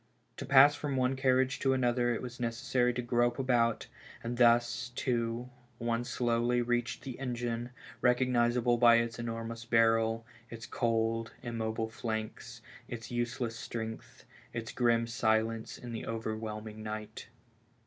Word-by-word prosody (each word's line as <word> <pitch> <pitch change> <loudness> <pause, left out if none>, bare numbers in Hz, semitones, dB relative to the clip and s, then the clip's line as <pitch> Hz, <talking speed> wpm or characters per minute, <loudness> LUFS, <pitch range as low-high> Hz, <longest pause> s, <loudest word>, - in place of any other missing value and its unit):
To - - -6
pass 140 +2 +8
from 145 -1 -3
one 130 0 +1
carriage 130 0 +2
to 135 -1 +2
another 120 -1 +2
it 120 - -2
was 125 0 -7
necessary 125 +1 +1
to 125 - -2
grope 120 0 +1
about, 120 -4 +1 0.4
and 120 +1 -3
thus, 120 0 +3
too, 120 0 -1 0.3
one 115 0 -1
slowly 120 0 +1
reached 120 0 -1
the 130 -3 -7
engine, 120 -2 -3 0.3
recognizable 125 -1 +3
by 120 -1 +7
its 115 0 0
enormous 115 0 -4
barrel, 115 0 +2 0.2
its 115 0 -8
cold, 115 -2 0
immobile 110 -1 -3
flanks, 110 -1 -5 0.2
its 115 -1 -7
useless 120 -1 -2
strength, 115 +2 -7 0.3
its 115 -2 -4
grim 115 -2 +2
silence 115 -1 0
in 120 - -8
the 115 - -5
overwhelming 110 -1 -4
night. 110 0 -6
120 Hz, 135 wpm, -31 LUFS, 115-125 Hz, 0.4 s, pass